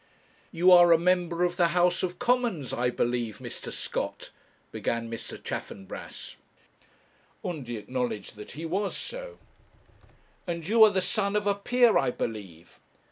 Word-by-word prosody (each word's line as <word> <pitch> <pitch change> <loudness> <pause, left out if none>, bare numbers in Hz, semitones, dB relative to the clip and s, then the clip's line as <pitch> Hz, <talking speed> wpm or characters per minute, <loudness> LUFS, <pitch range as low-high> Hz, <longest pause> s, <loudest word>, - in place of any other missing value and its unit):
'You 180 +1 +4
are 175 -1 +8
a 165 - +8
member 175 0 +1
of 175 0 0
the 175 - +4
House 175 0 +3
of 180 -1 -2
Commons, 240 - 0
I 125 +1 +1
believe, 120 -3 -1
Mr. - - -7
Scott?' - - -4 0.4
began 115 0 -2
Mr. 115 - -6
Chaffanbrass. 95 -1 -7 1.1
Undy 135 -10 -4
acknowledged 120 -1 -4
that 105 0 -10
he 160 +3 -6
was 195 +5 -2
so. - - -7 1.1
'And 170 -2 -4
you 220 +2 +6
are - - +6
the 190 -2 0
son 200 +1 0
of 210 0 +1
a 200 - +3
peer, 240 +3 +3
I 135 - +1
believe?' 95 -9 -6
175 Hz, 145 wpm, -28 LUFS, 125-200 Hz, 1.1 s, are